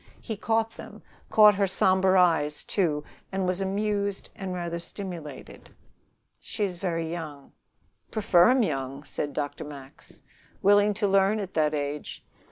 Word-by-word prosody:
He 225 - -5
caught 225 +2 0
them, - - -12 0.3
caught 210 -1 +7
her 200 0 +1
somber 190 0 +3
eyes 160 -5 +2
too, 155 -7 0 0.3
and 190 -1 -1
was 185 +1 -1
amused 200 0 -1
and 190 -2 -5
rather 170 -1 -3
stimulated. 170 -6 -8 0.7
"She 210 - -4
is 185 -3 -2
very 165 -3 -2
young." 155 -5 -7 0.6
"Prefer 195 -3 +4
'em 255 -1 +4
young," 135 -5 -3
said 145 0 -4
Dr. 145 +1 -3
Max. 140 -2 -11 0.4
"Willing 205 +1 +5
to 210 0 +1
learn 195 +2 +3
at 195 -3 -5
that 155 -1 +2
age. 145 0 -4
185 Hz, 145 wpm, -27 LUFS, 150-200 Hz, 0.7 s, caught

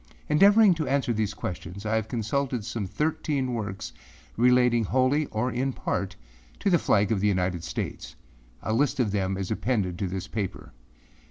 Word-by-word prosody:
Endeavoring 200 +5 +6
to 160 -3 -3
answer 135 -3 +1
these 105 -2 -1
questions, 90 +2 -6
I 105 - 0
have 110 -1 0
consulted 120 +1 -2
some 115 -4 -3
thirteen 145 - -1
works 100 -4 -4 0.4
relating 125 -1 +4
wholly 130 +6 +2
or 110 +4 -1
in 130 +3 -1
part 95 -2 -3 0.5
to 200 - +2
the 175 - +5
flag 105 -4 +2
of 110 - +2
the 105 - +2
United 90 -3 0
States. - - -5 0.5
A 110 - -1
list 140 +3 +1
of 115 -5 +2
them 95 -1 -1
is 95 0 -4
appended 105 -6 -1
to 100 - -1
this 95 +2 -4
paper. 105 -4 -5
110 Hz, 170 wpm, -26 LUFS, 100-130 Hz, 0.5 s, Endeavoring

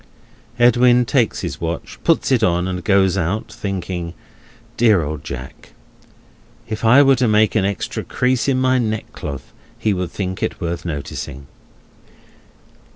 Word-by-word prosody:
Edwin 125 0 +5
takes 120 -3 +1
his - - -5
watch, - - -5
puts - - +2
it - - +3
on, 90 +1 +1
and 90 -1 -4
goes 95 -2 +3
out, 95 +6 -2
thinking: 90 -3 -4 0.6
"Dear 110 -7 +4
old 75 -1 -5
Jack! 65 0 -9 0.9
If 110 -1 -5
I 125 +5 +7
were 135 -1 +4
to 125 0 +2
make 110 0 +3
an 110 -4 +2
extra 100 -3 -3
crease 125 0 0
in 135 -2 +2
my 130 0 +2
neckcloth, 105 - -5 0.2
he 110 - 0
would 90 -2 -3
think 95 0 -4
it - - -2
worth 85 -1 -4
noticing!" 70 -3 -5
100 Hz, 145 wpm, -19 LUFS, 85-120 Hz, 0.9 s, I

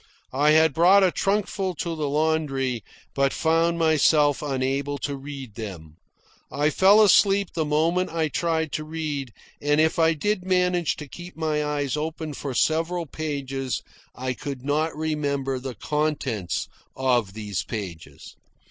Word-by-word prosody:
I 145 +3 +3
had 160 -1 +5
brought 185 +6 +6
a 185 - +4
trunkful 195 -2 -1
to 165 +2 -3
the 150 -2 -2
laundry, 140 -6 0 0.3
but 140 0 +2
found 165 +1 +2
myself 155 -2 +3
unable 140 0 -1
to 140 0 -3
read 135 -4 -8
them. 90 -8 -8 0.5
I 150 +2 +1
fell 200 +5 +6
asleep 200 -1 +4
the 160 -2 -1
moment 165 +5 +1
I 160 -1 0
tried 160 0 -1
to 155 - -3
read; 155 -5 -4 0.3
and 145 +1 +2
if 160 +1 +2
I 165 0 +4
did 205 +5 -1
manage 180 -3 +1
to 150 - -8
keep 175 +5 -10
my 155 -2 0
eyes 145 -2 -1
open 155 0 -4
for 140 -2 -5
several 165 +4 +1
pages, 135 -4 -4 0.3
I 130 0 -3
could 135 0 -7
not 150 +2 0
remember 140 -4 -1
the 130 -1 -6
contents 135 - -2 0.3
of 120 -7 +1
those 105 -3 -3
pages. 85 -9 -8
150 Hz, 150 wpm, -24 LUFS, 135-165 Hz, 0.5 s, brought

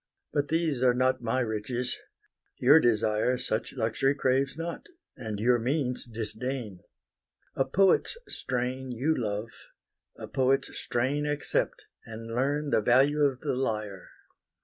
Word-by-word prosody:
But 145 -1 +1
these 160 -4 0
are 125 -1 +4
not 130 0 +1
my 120 +2 0
riches: 120 +2 -2 0.6
your 145 +6 +7
desire 110 -1 +2
Such 115 -3 -2
luxury 130 +3 +1
craves 135 +1 +1
not, 165 +1 -5 0.3
and 110 -5 -5
your 120 +2 +3
means 125 +1 -1
disdain: 115 -1 -3 0.8
A 135 - +1
poet's 195 - +3
strain 130 +1 -3
you 130 +7 0
love; 110 0 -3 0.7
a - - -7
poet's 135 +1 +1
strain 140 +5 -1
Accept, 145 0 -1 0.2
and 115 0 -8
learn 140 +4 0
the - - +3
value 135 +7 +4
of 135 -3 +2
the - - -1
lyre. 105 -6 -3
125 Hz, 130 wpm, -28 LUFS, 115-140 Hz, 0.8 s, your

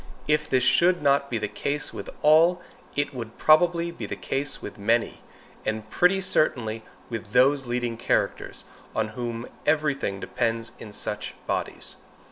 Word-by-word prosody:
If 150 0 +1
this 130 -1 +3
should 175 +4 +4
not 140 0 +3
be 120 - -1
the 105 -1 -1
case 145 +7 -3
with - - -6
all, 165 +4 +6 0.4
it 145 0 0
would 115 -3 -7
probably 170 +2 +4
be 170 - -6
the - - -4
case 145 +2 -2
with - - -8
many, 115 +3 +1 0.4
and 110 0 -3
pretty 190 +2 +4
certainly 115 -11 +1 0.3
with 115 -2 -5
those 135 +1 +4
leading 120 -1 -1
characters, - - -1 0.3
on 110 -1 0
whom 120 +1 -4 0.2
every 150 -1 +2
thing 100 -8 -3
depends 115 +2 -1
in 105 - -9
such - - -4
bodies. - - -3
130 Hz, 155 wpm, -26 LUFS, 115-150 Hz, 0.4 s, all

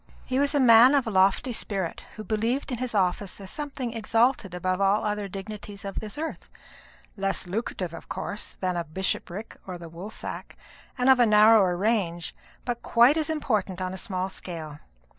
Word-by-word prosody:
He 260 +1 0
was 285 +1 +1
a - - +4
man 245 +2 +8
of 275 - +2
a 225 - -3
lofty 195 +6 +3
spirit, 195 -6 -3
who 215 - -7
believed 225 +7 -1
in 245 - -3
his 250 -3 -3
office 190 0 0
as 195 -1 -8
something 275 -5 -5
exalted 225 -3 +1
above 185 +2 -1
all 200 +2 +3
other 210 -1 -1
dignities 200 +1 -8
of 195 - -4
this 215 +3 -8
earth 320 +1 -5 0.7
less 195 -1 -1
lucrative, 180 -3 -3
of - - -10
course, 205 +1 -5
than 185 -1 0
a 170 - -1
bishopric 190 +4 -4
or 185 -1 -5
the 170 -1 -10
woolsack, 180 +6 -8 0.4
and 250 0 +1
of 265 -1 +7
a 240 - +6
narrower 210 -4 +6
range, 185 -5 0 0.3
but 240 -1 -3
quite 240 +5 +5
as 315 0 0
important 215 - -1
on 185 0 -3
a - - -5
small 185 -1 -3
scale. 160 -6 -8
210 Hz, 180 wpm, -26 LUFS, 185-235 Hz, 0.7 s, man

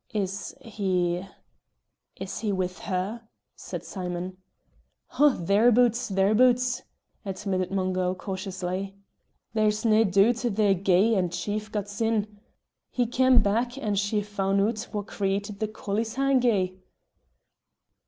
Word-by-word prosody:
"Is 195 -1 -3
he 185 -6 -1 0.9
is 190 0 -6
he 215 -1 -1
with 185 -1 -2
her?" 205 +5 -3 0.3
said - - -7
Simon. 180 -1 -5 0.8
"Oh, 295 +1 +8
thereaboots, 230 +6 +3
thereaboots," 245 +6 +3 0.4
admitted 190 -2 -2
Mungo, 185 -1 0
cautiously. 190 0 -4 0.6
"There's 215 0 +1
nae 220 -1 +5
doot 200 +5 +4
they're 215 -4 +2
gey 195 +4 +3
and 180 -4 +1
chief 210 +4 -3
got 210 -2 -2
sin! 210 0 -1 0.5
he 245 - 0
cam' 250 0 +4
back, 235 +5 0
and 210 -6 -1
she 205 +1 0
foun' 195 -1 0
oot 220 +3 0
wha 210 -2 -2
created 200 0 -3
the 215 - 0
collieshangie." 220 -2 0
205 Hz, 115 wpm, -26 LUFS, 190-225 Hz, 0.9 s, Oh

